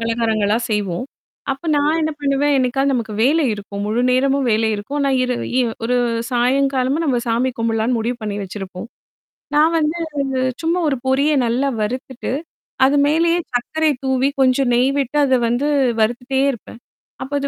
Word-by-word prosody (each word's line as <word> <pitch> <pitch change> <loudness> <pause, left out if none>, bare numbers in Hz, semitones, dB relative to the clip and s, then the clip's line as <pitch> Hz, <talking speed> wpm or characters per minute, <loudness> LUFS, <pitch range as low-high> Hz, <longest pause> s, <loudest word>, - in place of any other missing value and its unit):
பலகாரங்களா 225 -2 0
செய்வோம். 205 -1 -1 0.5
அப்ப 270 +6 -10
நான் 295 +2 +2
என்ன 315 0 0
பண்ணுவேன்? 285 +1 +1
என்னைக்காவது 270 +2 +1
நமக்கு 225 -4 -3
வேலை 300 +6 +3
இருக்கும். 200 -1 -6
முழு 225 +4 0
நேரமும் 275 +2 +2
வேலை 220 0 +2
இருக்கும். 210 +8 -4
ஆனா, 275 -1 +1
இர 255 - -1 0.3
இ - - +4 0.2
ஒரு 250 +2 +1 0.3
சாயங்காலமா 260 +2 +1
நம்ம 265 -5 +1
சாமி 240 +3 +1
கும்பிடலாம்னு 230 +1 0
முடிவு 235 +2 -2
பண்ணி 210 -1 -3
வச்சிருப்போம். 190 0 -7 0.7
நான் 310 +3 +4
வந்து, 310 +2 0 0.6
சும்மா 335 +2 0
ஒரு 270 - -1
பொரிய 275 +3 +2
நல்லா 250 +4 0
வறுத்துட்டு, 255 +3 -4 0.5
அது 280 +2 +3
மேலயே 335 +3 +2
சர்க்கரை 315 +6 0
தூவி, 265 0 +1
கொஞ்சம் 260 0 +3
நெய் 255 +3 +3
விட்டு 275 +2 -2
அத 260 -2 +3
வந்து 245 +5 0 0.3
வறுத்துட்டே 245 +4 0
இருப்பேன். 235 -2 -11 0.4
அப்ப 270 +2 -8
அது 280 - -2
255 Hz, 155 wpm, -19 LUFS, 230-280 Hz, 0.7 s, இ